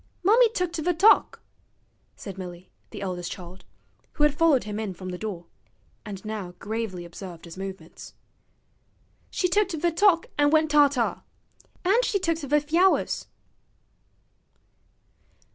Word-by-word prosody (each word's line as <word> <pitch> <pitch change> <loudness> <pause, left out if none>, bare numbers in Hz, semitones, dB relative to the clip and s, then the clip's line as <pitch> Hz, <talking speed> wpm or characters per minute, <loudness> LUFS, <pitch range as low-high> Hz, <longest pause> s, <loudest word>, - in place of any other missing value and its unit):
'Mummy 455 +5 +5
tooked 360 -6 -2
ve 340 +3 0
t'ock,' 390 +6 +4 0.7
said 195 -4 -8
Milly, 180 -1 -9 0.2
the - - -7
eldest 180 -2 -4
child, 180 0 -10 0.5
who 295 - 0
had 295 -1 +4
followed 300 -4 +3
him 210 0 -5
in 205 -4 -4
from 185 +1 -7
the 180 - -5
door, 195 -6 -5 0.6
and 200 -1 -8
now 205 -5 -5
gravely 210 -4 -4
observed 170 -1 -10
his 170 - -10
movements. 190 0 -9 1.1
'She 365 - 0
tooked 390 +1 +1
ve 335 +2 0
t'ock 345 0 +4
an' 290 0 +5
went 310 0 +3
ta 295 -1 +7
ta. 255 -4 -1 0.6
An' 410 +7 +4
she 440 - 0
tooked 330 -3 -1
ve 290 +1 +2
fyowers.' 335 +6 +1
265 Hz, 140 wpm, -26 LUFS, -, 1.1 s, ta